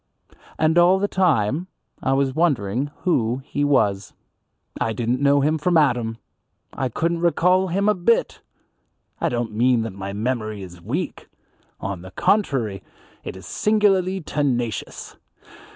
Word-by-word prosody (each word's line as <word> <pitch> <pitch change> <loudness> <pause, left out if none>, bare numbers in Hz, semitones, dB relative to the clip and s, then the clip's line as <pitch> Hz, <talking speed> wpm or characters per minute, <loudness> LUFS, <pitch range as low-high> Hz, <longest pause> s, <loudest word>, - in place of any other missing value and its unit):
And 160 +2 +3
all 180 +2 +5
the 200 +1 0
time 165 - +1 0.3
I 130 - +1
was 135 -1 +1
wondering 135 - 0
who 130 -7 0
he 145 - -2
was. 105 -9 +1 0.7
I 115 - 0
didn't 120 +4 -1
know 140 0 +4
him 155 +3 +1
from 175 +2 +2
Adam; 120 -7 +1 0.6
I 130 - -2
couldn't 170 +7 -1
recall 180 +2 +3
him 195 +4 0
a 210 - +5
bit. 200 +5 +1 0.8
I - - +1
don't 120 -2 -2
mean 120 +2 +2
that 110 -3 -5
my 100 0 -6
memory 110 -1 -3
is 90 -2 -11
weak. - - -4 0.5
On 100 -3 -4
the 95 - -10
contrary, 120 - 0 0.4
it - - -7
is 95 - -12
singularly 195 -3 +1
tenacious. 130 -7 -3
135 Hz, 140 wpm, -22 LUFS, 110-175 Hz, 0.8 s, all